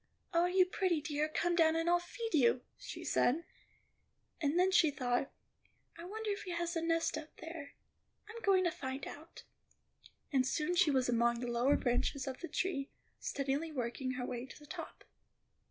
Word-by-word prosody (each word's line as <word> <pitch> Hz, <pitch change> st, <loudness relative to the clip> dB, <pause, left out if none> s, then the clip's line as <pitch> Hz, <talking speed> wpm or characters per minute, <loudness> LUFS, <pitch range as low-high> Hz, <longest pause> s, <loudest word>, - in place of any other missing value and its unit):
"Oh, 340 Hz, +1 st, +4 dB
you 365 Hz, 0 st, +5 dB
pretty 365 Hz, -2 st, +1 dB
dear, 300 Hz, 0 st, -1 dB
come 345 Hz, +3 st, +1 dB
down 320 Hz, -1 st, +5 dB
and 330 Hz, +1 st, 0 dB
I'll 350 Hz, 0 st, +5 dB
feed 450 Hz, +6 st, -6 dB
you," 250 Hz, -4 st, +4 dB
she -, -, -8 dB
said; 315 Hz, +7 st, +2 dB, 1.0 s
and 295 Hz, +2 st, +1 dB
then 370 Hz, +1 st, +4 dB
she 330 Hz, -4 st, +6 dB
thought, 255 Hz, -2 st, -1 dB, 0.6 s
"I 335 Hz, -, -9 dB
wonder 430 Hz, +3 st, -3 dB
if 405 Hz, -, -3 dB
he 360 Hz, -, -5 dB
has 345 Hz, +1 st, -2 dB
a 330 Hz, -, 0 dB
nest 330 Hz, 0 st, +1 dB
up 310 Hz, -, -12 dB
there; 320 Hz, -3 st, -8 dB, 0.5 s
I'm 455 Hz, +1 st, -8 dB
going 385 Hz, -3 st, +4 dB
to 350 Hz, -, +2 dB
find 265 Hz, -1 st, -5 dB
out." 315 Hz, +3 st, -10 dB, 0.9 s
And 265 Hz, -2 st, +4 dB
soon 300 Hz, +6 st, 0 dB
she 350 Hz, -3 st, +5 dB
was 260 Hz, -3 st, +2 dB
among 235 Hz, 0 st, +2 dB
the 245 Hz, 0 st, -3 dB
lower 245 Hz, +4 st, +3 dB
branches 255 Hz, +2 st, 0 dB
of 265 Hz, -2 st, -5 dB
the 345 Hz, -, -5 dB
tree, 290 Hz, -8 st, -1 dB, 0.3 s
steadily 280 Hz, +4 st, -1 dB
working 255 Hz, -1 st, -2 dB
her 250 Hz, -1 st, -3 dB
way 245 Hz, +1 st, -4 dB
to -, -, -11 dB
the 295 Hz, -, -14 dB
top. 305 Hz, -, -8 dB
310 Hz, 185 wpm, -35 LUFS, 265-345 Hz, 1.0 s, she